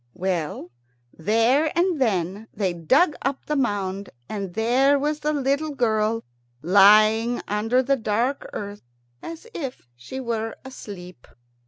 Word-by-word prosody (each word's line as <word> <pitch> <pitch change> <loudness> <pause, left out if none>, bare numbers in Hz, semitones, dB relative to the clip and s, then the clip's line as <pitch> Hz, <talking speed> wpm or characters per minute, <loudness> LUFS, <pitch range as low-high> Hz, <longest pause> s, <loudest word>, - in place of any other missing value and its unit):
Well, 175 -9 -3 0.4
there 230 - +2
and 345 -4 +1
then 200 -2 0
they 190 -4 -1
dug 265 - +3
up 275 0 -2
the 300 - -1
mound, 200 -6 -1 0.2
and 195 -4 -5
there 255 +6 +3
was 295 +2 -1
the 300 0 0
little 285 +1 -1
girl 225 -2 +1 0.4
lying 215 +6 +5
under 225 +5 +1
the 275 +1 +2
dark 235 +5 -1
earth 205 0 -6 0.4
as 330 +5 -8
if 265 - -6
she 125 - -8
were 225 -3 -3
asleep. 185 - -10
225 Hz, 130 wpm, -24 LUFS, 200-270 Hz, 0.4 s, lying